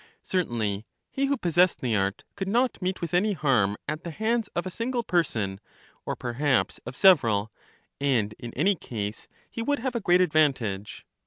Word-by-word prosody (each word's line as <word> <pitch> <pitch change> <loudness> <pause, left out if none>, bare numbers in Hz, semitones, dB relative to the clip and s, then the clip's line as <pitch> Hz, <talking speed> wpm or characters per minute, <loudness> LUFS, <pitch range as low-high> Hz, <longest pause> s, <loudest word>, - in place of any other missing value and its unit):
Certainly 115 - -1 0.2
he 275 - 0
who 280 0 +1
possessed 175 -2 +3
the 120 -4 0
art 100 +1 -1
could 195 -1 -4
not 240 +2 +1
meet 185 +1 -2
with 170 -1 -4
any 205 +4 +3
harm 125 - +2
at 155 +2 -3
the 170 - -5
hands 220 +5 0
of 175 - -1
a 185 - -4
single 240 +4 -2
person, 110 - 0 0.5
or - - -1
perhaps 130 +3 0
of - - -6
several; 115 - +4 0.5
and 120 -7 +1
in 120 - -7
any 185 +10 +3
case 110 - -5 0.2
he 230 - -6
would 285 +5 +1
have 255 0 -3
a 235 - -1
great 180 -1 +4
advantage. 135 - +1
155 Hz, 175 wpm, -26 LUFS, -, 0.5 s, several